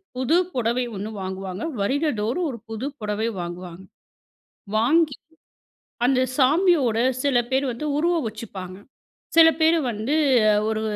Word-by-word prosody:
புது 260 Hz, +5 st, +1 dB, 0.2 s
புடவை 245 Hz, 0 st, 0 dB
1 205 Hz, +3 st, -5 dB
வாங்குவாங்க. 190 Hz, +1 st, -5 dB, 0.2 s
வருடந்தோறும் 270 Hz, -, 0 dB
ஒரு 240 Hz, -, -7 dB
புது 225 Hz, +3 st, -5 dB
புடவை 210 Hz, +1 st, -2 dB
வாங்குவாங்க. 175 Hz, +1 st, -8 dB, 0.9 s
வாங்கி, 290 Hz, +6 st, +3 dB, 0.9 s
அந்த 255 Hz, -1 st, +2 dB, 0.2 s
சாமியோட, 285 Hz, -, +3 dB, 0.2 s
சில 280 Hz, -4 st, +2 dB
பேர் 265 Hz, +1 st, +1 dB
வந்து 300 Hz, +6 st, -5 dB
உருவம் 335 Hz, -3 st, +1 dB
வச்சுப்பாங்க. 195 Hz, -4 st, -8 dB, 0.6 s
சில 325 Hz, -1 st, +9 dB
பேர் 320 Hz, +1 st, +4 dB
வந்து, 220 Hz, +8 st, -2 dB, 0.5 s
ஒரு 220 Hz, 0 st, -1 dB
240 Hz, 115 wpm, -23 LUFS, 210-295 Hz, 0.9 s, சில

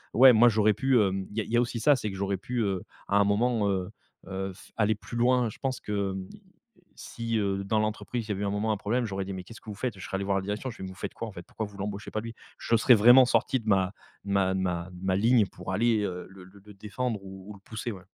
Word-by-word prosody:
Ouais, 130 Hz, +2 st, +9 dB
moi, 120 Hz, +2 st, +7 dB
j'aurais 110 Hz, -1 st, +3 dB
pu, 135 Hz, +5 st, +1 dB
heu... 100 Hz, -4 st, +3 dB, 0.2 s
il 105 Hz, -, -11 dB
y -, -, +2 dB
a -, -, -3 dB
il -, -, -10 dB
y 120 Hz, -, +3 dB
a -, -, +5 dB
aussi 120 Hz, -1 st, -2 dB
ça, 145 Hz, +6 st, +5 dB
c'est 110 Hz, -5 st, -3 dB
que 95 Hz, -, -7 dB
j'aurais 100 Hz, 0 st, -1 dB
pu 120 Hz, +5 st, -3 dB
heu, 95 Hz, -3 st, -1 dB, 0.3 s
à 100 Hz, -, +2 dB
un -, -, +5 dB
moment, 105 Hz, +1 st, +1 dB
heu 95 Hz, -2 st, -1 dB, 0.4 s
heu, 95 Hz, 0 st, -4 dB
f -, -, -17 dB
aller 110 Hz, 0 st, +3 dB
plus 115 Hz, +3 st, -10 dB
loin. 125 Hz, 0 st, +3 dB
Je -, -, -11 dB
pense 130 Hz, -3 st, -2 dB
que, 100 Hz, -2 st, -2 dB, 0.8 s
si, 115 Hz, -1 st, -4 dB
heu, 100 Hz, -1 st, -1 dB
dans 110 Hz, +2 st, +1 dB
l'entreprise, 110 Hz, +2 st, -2 dB
il -, -, -16 dB
y -, -, +1 dB
avait 100 Hz, +1 st, -3 dB
un 100 Hz, -, 0 dB
moment 105 Hz, +2 st, 0 dB
un 105 Hz, -, 0 dB
problème, 120 Hz, +5 st, -1 dB
j'aurais 95 Hz, -2 st, -3 dB
dit: 100 Hz, -, -5 dB
«Mais 95 Hz, -1 st, -6 dB
qu'est-ce 115 Hz, -, -12 dB
que -, -, -12 dB
vous -, -, -7 dB
faites»? 110 Hz, 0 st, -3 dB
Je -, -, -7 dB
serais -, -, -11 dB
allé 100 Hz, -, -3 dB
voir 100 Hz, 0 st, +1 dB
la 95 Hz, -, -2 dB
direction, 105 Hz, +6 st, -3 dB
je 115 Hz, -, -9 dB
fais: -, -, -8 dB
«Mais 95 Hz, -, -5 dB
vous 95 Hz, -, -9 dB
faites -, -, -6 dB
quoi, 115 Hz, -, -5 dB
en 110 Hz, -, -8 dB
fait? 90 Hz, -, -9 dB
Pourquoi 110 Hz, -, -4 dB
vous 100 Hz, -, -12 dB
l'embauchez 100 Hz, +1 st, -5 dB
pas, 110 Hz, -, -2 dB
lui»? 115 Hz, 0 st, -8 dB, 0.2 s
Je 115 Hz, -, +1 dB
serais 120 Hz, +2 st, +6 dB
vraiment 120 Hz, +4 st, +8 dB
sorti 130 Hz, +1 st, +1 dB
de 115 Hz, -, -13 dB
ma 95 Hz, -1 st, +2 dB, 0.3 s
de 100 Hz, -, -4 dB
ma 95 Hz, -1 st, +2 dB
de 95 Hz, -, -1 dB
ma 90 Hz, -1 st, -2 dB
ma 95 Hz, 0 st, +1 dB
ligne 115 Hz, +2 st, +4 dB
pour 95 Hz, -, -7 dB
aller, 110 Hz, +2 st, +2 dB
heu, 90 Hz, -3 st, -4 dB
le 95 Hz, -1 st, -13 dB
le 95 Hz, +2 st, -17 dB
le 105 Hz, 0 st, -13 dB
défendre 110 Hz, +3 st, -3 dB
ou 95 Hz, 0 st, -10 dB
ou -, -, -7 dB
le 100 Hz, -, -15 dB
pousser, 110 Hz, +3 st, -5 dB
ouais. 95 Hz, -4 st, -10 dB
105 Hz, 300 wpm, -28 LUFS, 95-115 Hz, 0.8 s, Ouais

